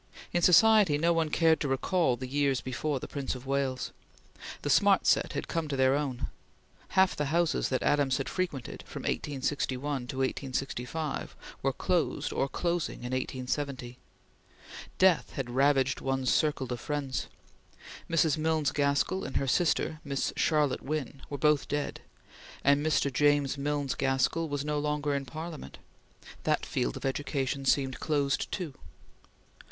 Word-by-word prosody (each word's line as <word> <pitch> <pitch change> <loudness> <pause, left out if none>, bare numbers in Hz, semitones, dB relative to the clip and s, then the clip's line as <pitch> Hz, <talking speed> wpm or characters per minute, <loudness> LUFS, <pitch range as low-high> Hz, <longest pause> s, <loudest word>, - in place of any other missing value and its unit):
In 175 - +2
society 190 -2 +6
no 170 +3 +3
one 165 -2 +1
cared 160 +1 +3
to 145 - -1
recall 135 +1 +1
the 130 - -5
years 140 -1 +1
before 135 +2 -2
the - - -7
Prince 140 -2 -3
of 125 +1 -9
Wales. 135 -1 -1 0.7
The - - -1
smart - - +4
set - - +3
had - - -3
come 165 -2 -2
to 145 - -2
their 130 0 +4
own. 140 -4 -2 0.7
Half 190 0 +5
the 150 - -1
houses 165 +3 +1
that 130 - 0
Adams 140 -3 +2
had 135 - -3
frequented, 170 -10 -3
from - - -7
1861 135 -1 -2
to 130 - -6
1865, 135 +2 -3 0.3
were - - +1
closed - - -1
or 140 - 0
closing 175 +2 -2
in 125 - -4
1870. 130 -1 -3 1.0
Death 185 -3 +3
had 130 -4 -4
ravaged 135 0 +2
one's 135 -1 +1
circle 150 -3 +1
of 120 - -5
friends. 140 -1 -3 0.8
Mrs. 160 -2 +2
Milnes 155 -2 +1
Gaskell 140 +6 +1
and 135 - -2
her - - 0
sister 155 +2 +1
Miss 140 -2 -2
Charlotte 150 -4 +2
Wynn 140 -2 -4
were 145 - -4
both 150 0 +2
dead, 145 0 -3 0.6
and 140 +1 +4
Mr. 150 -3 +1
James 145 0 +3
Milnes 145 -1 -1
Gaskell 135 +5 0
was 145 0 -2
no 150 0 0
longer 150 0 -1
in 140 -1 -2
Parliament. 160 +3 -7 0.7
That - - +1
field - - -1
of - - -7
education 135 0 -2
seemed 135 -1 +1
closed 140 -3 0
too. 175 -7 -4
145 Hz, 150 wpm, -29 LUFS, 135-155 Hz, 1.0 s, society